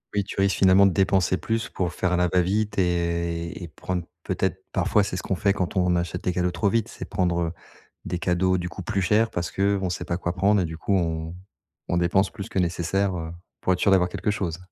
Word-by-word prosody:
Oui, 100 - +2
tu 95 - -6
risques 95 -1 +2
finalement, 95 +1 +6
de - - +2
dépenser 95 -1 +2
plus, 115 0 -2
pour 90 -2 -2
faire 90 - -1
à 90 - +2
la 90 - +3
va 90 -1 +3
vite 100 +2 0
et 85 -1 -1
et 85 - -5
prendre 90 +3 -4 0.2
peut-être - - -2
parfois 105 - +2
c'est 95 - -3
ce - - -3
qu'on 95 - -1
fait, 100 +2 +2
quand 90 -3 -2
on 90 -1 +3
achète 85 0 -2
des 90 - 0
cadeaux 90 0 +1
trop 100 +3 -1
vite. 115 +1 +1
C'est - - -8
prendre, 90 -2 0
heu, 85 -1 -1 0.5
des 90 - -3
cadeaux 95 +1 +1
du 90 0 -3
coup 85 +2 -8
plus 100 +2 -1
chers 110 +4 +3
parce 85 -1 -3
que, 100 - -3
heu, - - -1
on 95 - 0
sait 90 0 -3
pas 85 0 -2
quoi 85 0 -2
prendre. 100 +1 +3
Et 90 - 0
du 80 0 -6
coup, 85 - -2
on 80 -2 -1 0.5
on 85 - 0
dépense 90 +3 +2
plus 100 +3 -8
que - - -2
nécessaire, 90 +2 0
heu, 80 -1 -5 0.3
pour 95 - +2
être 90 - -1
sûr 100 - +4
d'avoir 90 -2 +4
quelque 105 - -1
chose. 90 -5 -2
90 Hz, 255 wpm, -25 LUFS, 85-95 Hz, 0.5 s, finalement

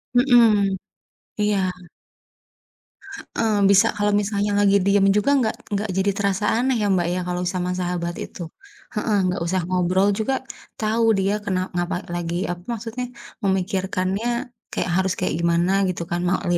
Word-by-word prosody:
Mhm, 225 -6 +5 0.6
iya. 210 -1 +2 1.8
Heeh, 220 -2 +2
bisa 200 +3 +6
kalau 205 0 +1
misalnya 205 0 -1
lagi 200 -1 +4
diem 200 0 +4
juga 275 +7 +2
enggak 225 -4 0 0.2
enggak 205 +1 -1
jadi 200 +1 +2
terasa 200 0 0
aneh, 255 +1 +1
ya, 205 - +1
Mbak, 175 -2 +1
ya, 185 - -1
kalau 180 0 -2
sama 180 0 -2
sahabat 175 -1 -2
itu. - - -11 0.6
Heeh, 210 -1 +1
enggak 180 -1 -1
usah 185 +1 0
ngobrol 185 +2 +2
juga 245 +5 0 0.5
tahu, 220 +2 +1 0.2
dia 195 +2 +1
kena 185 -2 0 0.2
ngapa 175 +1 -1 0.2
lagi 170 0 -3 0.2
apa, 175 0 -7
maksudnya, 230 +3 -5 0.4
memikirkannya 190 +2 -1 0.5
kayak - - -1
harus 190 -1 +1
kayak 180 - 0
gimana 170 +2 +2 0.2
gitu 170 - -3
kan, 175 - -1
mau 180 - +1
li 175 - +3
195 Hz, 150 wpm, -22 LUFS, 180-210 Hz, 1.8 s, bisa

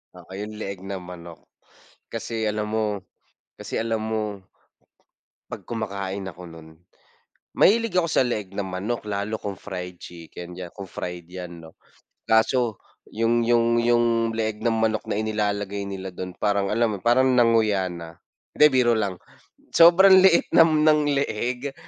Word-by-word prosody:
Oo, 90 0 -15
yung 105 +1 -6
leeg 100 -3 -6
ng 95 -2 -5
manok. 85 -2 -11 0.6
Kasi, 110 -1 -4
alam 105 0 -2
mo 105 -3 -1 0.6
kasi, - - -6
alam 115 -1 -1
mo 110 0 -2 1.3
'pag - - -8
kumakain 100 -3 -4
ako 90 +1 -12
no'n 80 -1 -13 0.9
mahilig 230 0 +4
ako 170 - 0
sa 155 - +2
leeg 105 -6 -4
ng 100 - -2
manok 95 +6 -4
lalo 105 +1 -3
kung 100 -3 -6
fried 90 -3 -7
chicken 85 +1 -10
'yan, 90 -1 -8
kung 100 -1 -9
fried 90 -2 -7
'yan, 90 -1 -8
'no, 80 -1 -14 0.5
kaso 110 0 +2 0.4
yung 115 +1 +1
yung 120 0 +3
yung 115 -1 +2
leeg 110 -1 -2
ng 115 - +3
manok 110 -1 0
na - - -2
inilalagay 105 -2 -2
nila 95 -1 -6
do'n 90 0 -7
parang 100 -1 0
alam 115 0 +2
mo - - -3
'yon, - - -27
parang 130 +2 +4
nanguya 115 -6 +3
na. 85 -1 -9 0.4
Hindi, 150 - +6
biro 125 -2 +3
lang, 100 -4 -1 0.6
sobrang 180 +3 +8
liit 185 -3 +5
ng 155 -2 +5
leeg 130 0 -2
105 Hz, 150 wpm, -24 LUFS, 95-120 Hz, 1.3 s, sobrang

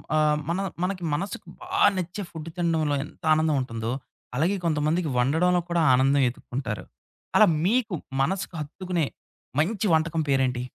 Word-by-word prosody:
ఆహ్, 150 -1 +3
మన 175 - 0 0.2
మనకి 185 -1 -2
మనసుకి 190 +7 -3 0.2
బాగా 385 +2 +3
నచ్చే 185 +3 -3
ఫుడ్ 160 0 -7
తినడంలో 160 -4 +1
ఎంత - - -17
ఆనందం 155 -1 +2
ఉంటుందో, 115 -2 -3 0.4
అలాగే 175 +9 +2
కొంతమందికి 155 +1 +1
వండడంలో 165 +8 +3
కూడా 170 -1 +2
ఆనందం 135 +2 +4
ఎతుక్కుంటారు. 120 -5 -5 0.5
అలా - - +8 0.2
మీకు 220 -1 +2 0.3
మనసుకు 185 +6 -1
హత్తుకునే 170 +2 -2 0.5
మంచి 205 +7 +1
వంటకం 160 0 +2
పేరేంటి? 130 -2 +2
160 Hz, 135 wpm, -26 LUFS, 140-180 Hz, 0.5 s, అలా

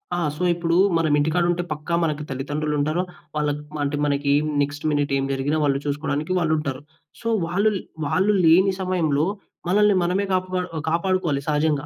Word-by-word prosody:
ఆ! - - -2 0.2
సో, 180 - -4
ఇప్పుడు 170 0 -1 0.2
మనమింటికాడుంటే, 165 +3 +1
పక్కా 155 +3 -4
మనకి 150 -1 -1
తల్లిదండ్రులుంటారు. 150 +4 -1 0.3
వాళ్ళక్ 150 -1 -1
మ - - -3
అంటే 145 +1 -1
మనకి 140 0 0 0.3
నెక్స్ట్ 145 +1 -3
మినిట్ 145 -1 0
ఏం 135 - -1
జరిగినా 140 +3 0
వాళ్ళు 140 -1 +2
చూసుకోడానికి 150 +3 -2
వాళ్ళుంటారు. 150 -5 -1 0.4
సో, 230 - -5 0.2
వాళ్ళు 200 +5 +2 0.3
వాళ్ళు 185 +8 +2
లేని 190 +4 +5
సమయంలో 160 -5 +1 0.4
మనల్ని 205 +1 +4
మనమే 185 +3 0
కాపా 185 0 0 0.2
ఒ - - -1
కాపాడుకోవాలి 170 -4 0
సహజంగా. 150 -1 +1
155 Hz, 145 wpm, -23 LUFS, 145-180 Hz, 0.4 s, లేని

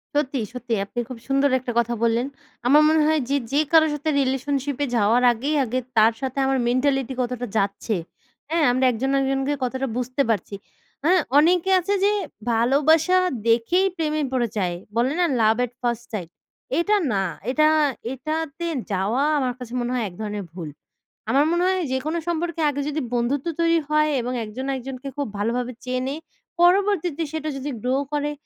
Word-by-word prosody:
সত্যি, 280 -2 0
সত্যি 245 -1 -4
আপনি 240 - -5
খুব 255 - -6
সুন্দর 275 +1 +3
একটা 245 -1 -4
কথা 235 0 0
বললেন। 235 +2 +2 0.4
আমার 295 +4 +7
মনে 315 0 +3
হয় 315 0 +3
যে, 280 - +2 0.2
যে 285 - +3
কারো 320 -1 +6
সাথে 295 +2 -2
রিলেশনশিপে 275 +1 -1
যাওয়ার 230 +3 +3
আগেই 270 +6 -2
আগে 255 +1 -1 0.2
তার 220 +1 +6
সাথে 265 0 -4
আমার 270 0 +1
মেন্টালিটি 265 +1 +1
কতটা 250 0 -3
যাচ্ছে। 200 +2 -1 0.5
হ্যাঁ? 330 0 +1
আমরা 255 +1 +2
একজন 250 +3 -2
একজনকে 270 +1 0
কতটা 260 +2 -2
বুঝতে 255 +2 -1
পারছি। 205 -2 -1 0.5
হ্যাঁ? 355 +3 +4 0.2
অনেকে 350 +4 +4
আছে 380 +3 -1
যে, 405 - +4 0.4
ভালোবাসা 295 +9 +3 0.3
দেখেই 240 +12 +3
প্রেমে 310 -3 -1
পড়ে 245 -2 +1
যায়, 180 -3 0 0.2
বলে 245 +4 +2
না, 355 - +4 0.2
"লাভ 220 0 +4
অ্যাট 250 -2 -1
ফার্স্ট 240 -1 -2
সাইট?" 180 -6 -4 0.5
এটা 415 +5 +2 0.2
না। 195 -2 +1 0.3
এটা 305 +3 +4 0.5
এটাতে 310 +4 -4 0.3
যাওয়া 200 +8 +1 0.2
আমার 255 -2 0
কাছে 245 -1 -8
মনে 240 0 -2
হয় 250 -2 0
এক - - -15
ধরনের 210 -1 -4
ভুল। 170 -3 -7 0.6
আমার 280 +2 +4
মনে 345 +1 +1
হয় 375 0 +1
যেকোনো 285 +6 -1
সম্পর্কে 340 -1 -2
আগে 285 0 -2
যদি 305 +1 -2
বন্ধুত্ব 250 +5 0
তৈরি 335 0 +3
হয় 305 0 +3
এবং 245 +2 -3
একজন 230 +5 -6
একজনকে 260 +1 -7
খুব 285 - -1
ভালোভাবে 240 +4 -1
চেনে, 255 +2 -2 0.5
পরবর্তীতে 355 -3 +3
সেটা 310 -1 -3
যদি 275 +2 -4
গ্রো 255 +3 0 0.2
করে, 295 0 0
265 Hz, 170 wpm, -23 LUFS, 240-305 Hz, 0.6 s, আমার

